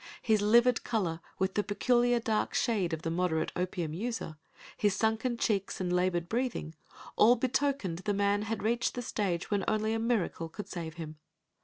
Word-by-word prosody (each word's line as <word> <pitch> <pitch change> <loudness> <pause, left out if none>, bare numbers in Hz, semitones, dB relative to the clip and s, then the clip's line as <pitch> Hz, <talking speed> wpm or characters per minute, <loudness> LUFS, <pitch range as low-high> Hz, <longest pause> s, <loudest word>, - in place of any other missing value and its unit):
His 220 -3 +3
livid 235 +3 +4
color, 180 -8 -1 0.2
with 190 0 0
the 210 - +2
peculiar 240 +4 +2
dark 220 -2 -1
shade 205 -8 +1
of 160 0 -4
the 165 - -1
moderate 170 -2 0
opium 175 -3 -2
user, 205 -4 -4 0.4
his 205 -2 +1
sunken 225 +3 0
cheeks 200 -4 -1
and 180 -1 -1
labored 180 -1 +1
breathing, 235 -8 -2 0.4
all 235 +3 +7
betokened 255 -7 0
the 205 +2 -1
man 200 0 +2
had 220 0 -3
reached 235 +2 0
the 245 - -3
stage 190 -6 -2
when 200 -2 +1
only 215 0 +1
a 225 - 0
miracle 220 -8 -1
could 205 +5 -7
save 165 -3 -6
him. 155 -2 -7
205 Hz, 175 wpm, -30 LUFS, 175-230 Hz, 0.4 s, all